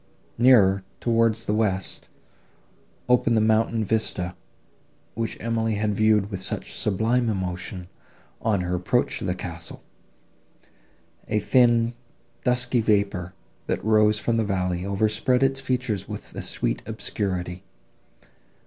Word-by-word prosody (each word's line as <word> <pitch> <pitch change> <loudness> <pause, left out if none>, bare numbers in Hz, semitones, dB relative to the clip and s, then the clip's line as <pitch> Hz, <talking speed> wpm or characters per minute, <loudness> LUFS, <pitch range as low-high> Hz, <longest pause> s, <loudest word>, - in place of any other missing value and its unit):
Nearer, 100 -6 +5 0.2
towards 115 -1 +1
the 105 - 0
west, 100 -4 -1 1.0
opened 120 -2 +3
the - - +4
mountain 110 0 +2
vista, 95 -4 -1 0.8
which 115 -1 -3
Emily 115 -1 -1
had 105 0 0
viewed 110 0 +2
with 95 -2 -4
such - - -4
sublime 115 +4 +1
emotion, 90 -2 -3 0.5
on 105 -4 +1
her 90 0 -2
approach 90 +8 0
to - - -5
the 90 -1 -1
castle: 85 -2 -7 1.4
a 110 - 0
thin 120 -1 +3 0.5
dusky 125 -1 +3
vapour, 100 -4 0 0.3
that - - -2
rose 105 -1 +4
from 115 +2 0
the 115 - +2
valley, 90 -3 -1
overspread 110 +6 +1
its 135 0 +2
features 125 -7 -2
with - - -7
a - - -5
sweet - - -2
obscurity. 90 -2 -3
110 Hz, 120 wpm, -24 LUFS, 95-115 Hz, 1.4 s, Nearer